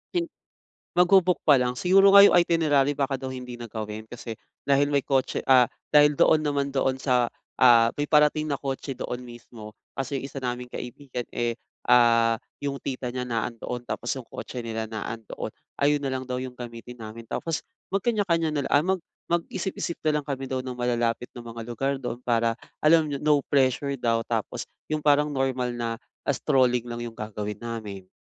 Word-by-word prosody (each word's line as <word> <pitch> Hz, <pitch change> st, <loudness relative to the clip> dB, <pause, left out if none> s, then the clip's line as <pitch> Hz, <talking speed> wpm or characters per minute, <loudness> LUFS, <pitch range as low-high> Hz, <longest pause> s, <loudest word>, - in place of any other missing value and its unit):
Hin 340 Hz, -1 st, +1 dB, 0.7 s
mag-bo-book 180 Hz, 0 st, +5 dB
pa 145 Hz, -3 st, +7 dB
lang. 125 Hz, 0 st, 0 dB
Siguro 195 Hz, +6 st, +5 dB
nga 200 Hz, 0 st, +10 dB
yung -, -, +7 dB
itinerary 150 Hz, -5 st, +3 dB
baka 135 Hz, -2 st, -1 dB
daw 130 Hz, -, -4 dB
hindi 125 Hz, -2 st, -7 dB
na 120 Hz, -, -6 dB
gawin 110 Hz, 0 st, -6 dB
kasi 120 Hz, -1 st, -7 dB, 0.3 s
dahil 140 Hz, 0 st, +3 dB
may 140 Hz, -2 st, +1 dB
kotse 135 Hz, -2 st, 0 dB
ah, 130 Hz, -3 st, +6 dB, 0.2 s
dahil 150 Hz, 0 st, +6 dB
doon 155 Hz, -, +5 dB
naman 140 Hz, -2 st, -1 dB
doon 135 Hz, -1 st, +1 dB
sa 125 Hz, -3 st, +2 dB, 0.3 s
ah, 120 Hz, -2 st, +7 dB
may 145 Hz, -, -1 dB
parating 150 Hz, 0 st, +3 dB
na 140 Hz, -, 0 dB
kotse 135 Hz, -1 st, -4 dB
doon 125 Hz, -1 st, -4 dB
mismo 120 Hz, -3 st, -11 dB, 0.2 s
kasi 135 Hz, +1 st, -2 dB
yung -, -, -8 dB
isa 140 Hz, -, -7 dB
naming 125 Hz, -1 st, -3 dB
kaibigan, 125 Hz, 0 st, -6 dB
eh, 120 Hz, -1 st, -1 dB, 0.3 s
ah 115 Hz, -1 st, +5 dB, 0.3 s
yung 140 Hz, -1 st, -2 dB
tita 125 Hz, -2 st, -4 dB
niya 125 Hz, 0 st, -3 dB
na 115 Hz, -2 st, 0 dB
andoon 120 Hz, +1 st, -6 dB
tapos 120 Hz, -, -5 dB
yung 130 Hz, -, -6 dB
kotse 125 Hz, -, -6 dB
nila 110 Hz, -1 st, -3 dB
na 110 Hz, -1 st, -5 dB
andoon. 110 Hz, -2 st, -7 dB, 0.3 s
Ayon 145 Hz, +1 st, +3 dB
na 140 Hz, -, -2 dB
lang 130 Hz, 0 st, -3 dB
daw 125 Hz, 0 st, -3 dB
yung 130 Hz, -1 st, -7 dB
gamitin 120 Hz, 0 st, -9 dB
namin 115 Hz, 0 st, -9 dB
tapos 165 Hz, -2 st, -2 dB, 0.3 s
magkanya-kanya 195 Hz, -6 st, +1 dB
na 145 Hz, -, +2 dB
lang, -, -, -5 dB
ah, 145 Hz, +3 st, +5 dB
mag -, -, -15 dB, 0.3 s
mag-isip-isip 170 Hz, 0 st, -2 dB
na 150 Hz, -1 st, +3 dB
lang -, -, -16 dB
kami 135 Hz, -2 st, -4 dB
daw 130 Hz, -1 st, -2 dB
ng 125 Hz, -1 st, -6 dB
malalapit 120 Hz, -1 st, 0 dB
na 120 Hz, -, -8 dB
mga 115 Hz, -1 st, -8 dB
lugar 130 Hz, +4 st, -1 dB
do'n 125 Hz, -1 st, -5 dB
para 115 Hz, -1 st, +1 dB, 0.2 s
alam 155 Hz, -1 st, +4 dB
niyo, 140 Hz, -, -2 dB
'no 150 Hz, 0 st, +3 dB
pressure 135 Hz, 0 st, +1 dB
daw 115 Hz, -1 st, +1 dB
tapos 115 Hz, -2 st, -3 dB, 0.2 s
yung 155 Hz, -1 st, -2 dB
parang 150 Hz, 0 st, +4 dB
normal 130 Hz, -2 st, -1 dB
na 120 Hz, -1 st, -2 dB, 0.4 s
strolling 125 Hz, -2 st, +2 dB
lang 120 Hz, 0 st, -5 dB
yung 115 Hz, -1 st, -7 dB
gagawin 105 Hz, -1 st, -5 dB
namin. 110 Hz, -5 st, -6 dB
130 Hz, 185 wpm, -26 LUFS, 120-145 Hz, 0.7 s, nga